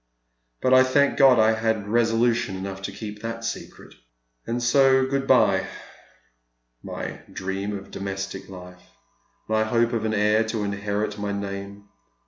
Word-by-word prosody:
But 130 - +3
I 130 - +8
thank 140 +2 +2
God 135 -3 +6
I 110 0 +5
had 110 -2 -1
resolution 115 -2 +1
enough 95 0 -6
to 95 - -5
keep 105 +1 -8
that 115 0 -5
secret. 115 - -7 0.5
And 120 +1 -2
so 130 +1 +4
good 135 0 -2
bye - - +4 1.1
my - - -6
dream 95 +2 -4
of 100 - -12
domestic 95 0 -5
life, 90 -1 -11 0.7
my 110 0 +2
hope 115 +2 +1
of 115 -2 -1
an 110 -1 -1
heir 105 +1 +3
to 110 -1 -3
inherit 100 +1 -3
my 100 0 -2
name. 100 0 -6
110 Hz, 145 wpm, -24 LUFS, 100-115 Hz, 1.1 s, I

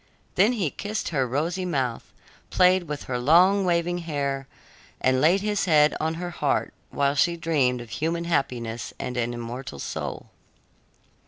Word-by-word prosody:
Then 205 +7 +4
he 190 - -1
kissed 215 +2 -4
her 135 -6 0
rosy 165 +9 -1
mouth, 135 -9 -2 0.4
played 185 0 +4
with 150 -2 -5
her 125 -1 -3
long, 180 +9 +5
waving 175 0 +1
hair, 140 -5 -3 0.5
and 130 0 +2
laid 175 +6 +4
his 210 -1 0
head 150 -3 +5
on 160 +1 -1
her 175 +1 -5
heart, 155 - -1 0.2
while 140 0 +1
she 170 +4 +2
dreamed 140 -7 +1
of 120 - -11
human 165 +2 -1
happiness 120 -8 -2
and 125 - -4
an 120 -1 -1
immortal 120 - -6
soul. - - -5
155 Hz, 155 wpm, -25 LUFS, 130-175 Hz, 0.5 s, long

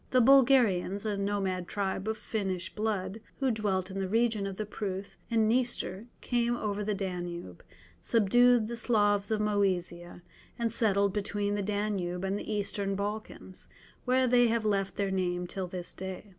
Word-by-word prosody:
The 255 - +4
Bulgarians, 235 -7 +4
a 210 -1 0
nomad 195 -3 -1
tribe 195 0 -2
of 220 0 -1
Finnish 190 -4 -3
blood, 210 -1 -2 0.2
who 265 -2 +2
dwelt 195 -4 -1
in 195 - -4
the 190 - -1
region 220 -2 +1
of 195 -1 -6
the 215 - -2
Pruth 200 -2 -5
and 225 -2 +3
Dniester, 235 -3 -1
came 240 -1 0
over 210 -2 -2
the 210 0 -1
Danube, 175 - -5 0.4
subdued 235 - +4
the 235 - -4
Slavs 205 -4 +2
of 220 -1 +1
Moesia, 180 -4 -1 0.3
and 230 -2 0
settled 200 -4 +2
between 205 0 -1
the 205 - -1
Danube 200 -3 -2
and 195 +1 0
the 205 - -5
Eastern 200 -1 -1
Balkans, 205 -2 -5 0.4
where 255 +1 +3
they 245 -1 +5
have 230 -1 0
left 195 -2 0
their 200 -1 -1
name 180 -2 -1
till 185 +1 -4
this 180 0 -5
day. 190 +2 -7
205 Hz, 165 wpm, -30 LUFS, 190-220 Hz, 0.4 s, they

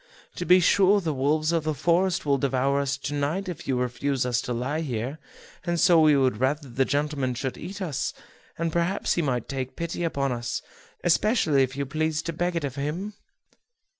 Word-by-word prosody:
To 175 - -3
be 180 +1 +7
sure 195 +3 +4
the 165 -5 -2
wolves 150 +4 +1
of 165 -2 +1
the 155 -1 -1
forest 175 +5 +1
will 140 -1 +2
devour 135 +1 +1
us 140 -1 -1
to 140 +1 -5
night 150 +7 -1
if 175 -5 -6
you 130 - +1
refuse 125 +2 -1
us 125 -1 +1
to 125 - -5
lie 130 +6 -1
here; 130 +1 -3 0.4
and 175 -1 -1
so 175 -2 +6
we 150 -2 +5
would 130 -2 +2
rather 140 +3 0
the 130 +3 +1
gentleman 145 -3 -1
should 130 +1 -3
eat 195 +1 -6
us; 155 -7 -2 0.5
and 165 -1 -1
perhaps 170 +3 +1
he 170 - 0
may 130 -5 0
take 130 +1 -5
pity 170 +1 -3
upon 140 -5 0
us, 120 0 -3 0.4
especially 170 - +3
if 130 0 -1
you 140 - -1
please 155 +2 -1
to 170 - -3
beg 175 +2 -1
it 165 - -1
of 140 -3 -3
him." 165 +9 -3
145 Hz, 200 wpm, -26 LUFS, 135-170 Hz, 0.5 s, be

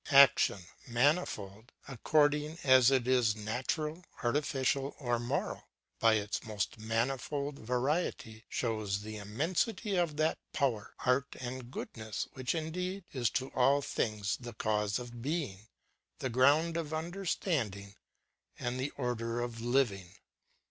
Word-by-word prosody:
Action, 135 -8 +6 0.2
manifold, 120 - 0
according 150 +4 +2
as 130 -2 +7
it 130 -3 +2
is 125 -5 +3
natural, 130 +10 -2 0.2
artificial, 135 +1 0
or 120 -4 0
moral, 120 +4 -2 0.3
by 115 -1 +5
its 105 -1 -2
most 110 0 -3
manifold 135 +6 -1
variety, 125 -2 -1
shows 110 -4 -1
the 110 0 -6
immensity 170 - -1
of 165 -4 +1
that 155 +1 +1
power, 120 -7 0
art, 130 +2 +2
and 130 +1 -4
o 125 - -5
oodness 110 -2 -5
which 130 +4 -2
indeed 180 +4 -3
is 125 -5 +1
to 130 +1 -2
all 135 +3 +4
thino 110 -6 -1
s 100 0 0
the 120 -2 -8
cause 105 -1 0
of 120 -1 -7
beino, 130 - -3 0.5
the 130 - -3
ground 145 +7 +4
of 160 -2 -2
understanding, 155 - -2 0.6
and 125 +1 -3
the 135 +3 -1
order 120 -2 -1
of 120 -1 -4
living. 115 -8 +1
125 Hz, 130 wpm, -32 LUFS, 110-145 Hz, 0.6 s, as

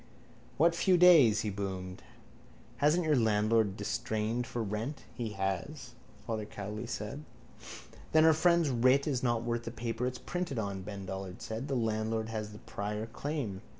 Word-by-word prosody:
—What 165 +3 +5
few 180 +2 +3
days? 155 -12 +7
he 105 - -2
boomed. 95 -2 -5 0.8
Hasn't 155 +4 +3
your 155 -1 +3
landlord 110 -3 +2
distrained 110 +3 -2
for 120 -1 -3
rent? 110 +8 -4
—He 115 -4 -4
has, 95 - -3 0.3
Father 110 -2 -2
Cowley 105 +1 -6
said. 110 +8 -5 0.9
—Then 155 0 +6
our 160 - +7
friend's 170 -1 +3
writ 130 +3 +4
is 135 -5 0
not 120 -2 +1
worth 120 0 -1
the - - -3
paper 115 +1 -3
it's 125 0 -4
printed 175 -2 -4
on, 100 -3 -3
Ben 100 0 -7
Dollard 95 -1 -6
said. 110 +5 -4
The 135 - -1
landlord 110 -1 -1
has 110 -1 -4
the 105 - -10
prior 105 +1 -4
claim. 115 -4 -4
115 Hz, 160 wpm, -31 LUFS, 105-140 Hz, 0.9 s, days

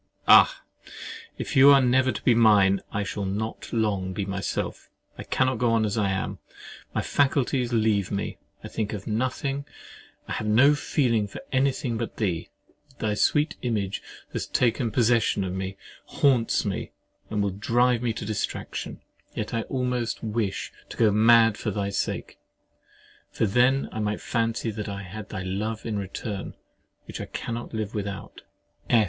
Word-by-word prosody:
Ah! - - +7 0.8
if - - -4
you 135 +1 +8
are 140 -1 +8
never 130 0 +3
to - - -6
be 125 - +5
mine, 105 -4 +5
I 100 - -1
shall 100 +1 -4
not 105 +4 -4
long 100 -5 0
be 100 +1 -2
myself. 100 0 -3 0.3
I - - -8
cannot 130 -2 0
go 120 0 +2
on 110 -1 +3
as 105 - -1
I 105 -3 +1
am. 95 0 -2 0.5
My - - -1
faculties 135 -3 +1
leave 110 -4 +2
me: 100 -1 -3 0.2
I - - -5
think 110 -1 -3
of 100 -2 -6
nothing, 130 +5 -1 0.6
I - - -8
have 110 - -2
no 125 +7 +6
feeling 125 -7 +1
about 100 - -9
any 135 +1 +3
thing 120 -4 -3
but 115 - -4
thee: 90 -7 -1 0.5
thy 110 -1 -1
sweet 150 +8 +2
image 105 -5 -1 0.3
has - - -3
taken 120 0 +1
possession 115 -3 +2
of 90 -1 -3
me, 95 0 -4 0.3
haunts 125 -5 +2
me, - - -3 0.4
and 105 -1 0
will 100 - 0
drive 120 +5 +2
me 120 -2 0
to 110 - -6
distraction. 110 -1 -4 0.3
Yet - - -4
I 115 - +1
could - - -10
almost 125 -3 -1
wish 105 -3 -2 0.2
to - - -9
go 110 -3 +4
mad 115 0 +5
for 110 - -2
thy 100 -1 -2
sake: 100 - -3 0.9
for - - 0
then 125 +6 +3
I 110 - -5
might 105 0 -1
fancy 115 0 -1
that 105 0 -5
I 100 0 -5
had 100 +2 -8
thy 95 - -4
love 105 +4 -3
in 105 -3 -2
return, 100 +1 -5 0.5
which - - -7
I - - -4
cannot 120 0 -5
live 110 -1 -3
without! 100 -2 -5
110 Hz, 170 wpm, -26 LUFS, 100-120 Hz, 0.9 s, you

